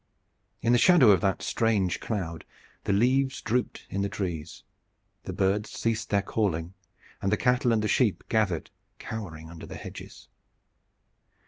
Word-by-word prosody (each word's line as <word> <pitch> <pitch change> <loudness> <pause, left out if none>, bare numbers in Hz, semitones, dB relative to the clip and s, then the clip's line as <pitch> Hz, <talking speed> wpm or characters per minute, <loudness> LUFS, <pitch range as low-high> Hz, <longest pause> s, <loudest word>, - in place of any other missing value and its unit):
In 115 - +3
the 120 - +5
shadow 165 - +7
of 95 - +4
that 95 -2 0
strange 105 -6 +1
cloud 85 -7 -4 0.4
the - - +1
leaves 130 +6 +2
drooped 125 +1 -2
in 100 - -3
the 100 - 0
trees, 85 -6 -5 0.6
the - - -4
birds 100 +3 0
ceased 115 -1 -2
their 100 -1 +2
calling, 90 -5 -1 0.5
and 95 - 0
the 105 - +3
cattle 125 0 +2
and 110 -2 +2
the - - +1
sheep 110 -3 +2
gathered 105 -7 0 0.3
cowering 80 -8 -7
under 85 - -10
the - - -8
hedges. - - -10
105 Hz, 150 wpm, -27 LUFS, 95-115 Hz, 0.6 s, shadow